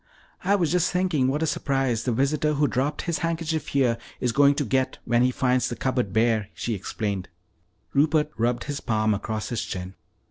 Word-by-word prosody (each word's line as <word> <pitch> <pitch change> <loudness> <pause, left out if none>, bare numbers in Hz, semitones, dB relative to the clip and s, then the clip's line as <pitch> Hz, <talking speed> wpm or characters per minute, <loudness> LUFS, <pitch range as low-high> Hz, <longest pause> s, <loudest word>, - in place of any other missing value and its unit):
"I 195 +2 +3
was 170 -6 +1
just 180 0 +2
thinking 180 -8 +1
what 145 +4 0
a - - +3
surprise 135 -6 0
the 125 - +1
visitor 140 +5 +1
who 145 +1 +3
dropped 140 +4 -1
his 170 -2 -1
handkerchief 165 -2 -2
here 125 -4 +1 0.2
is 125 - 0
going 140 +3 +5
to 145 - -1
get 130 +3 0
when 120 0 +2
he 125 - +4
finds 125 0 +1
the 120 - -4
cupboard 125 -6 -1
bare," 110 -1 +2
she 100 +8 -2
explained. 100 -1 -3 0.6
Rupert 150 +1 +3
rubbed 120 +1 0
his 145 -1 -4
palm 110 -1 +1
across 110 +1 -3
his 120 - -2
chin. 90 0 -5
130 Hz, 190 wpm, -25 LUFS, 115-150 Hz, 0.6 s, going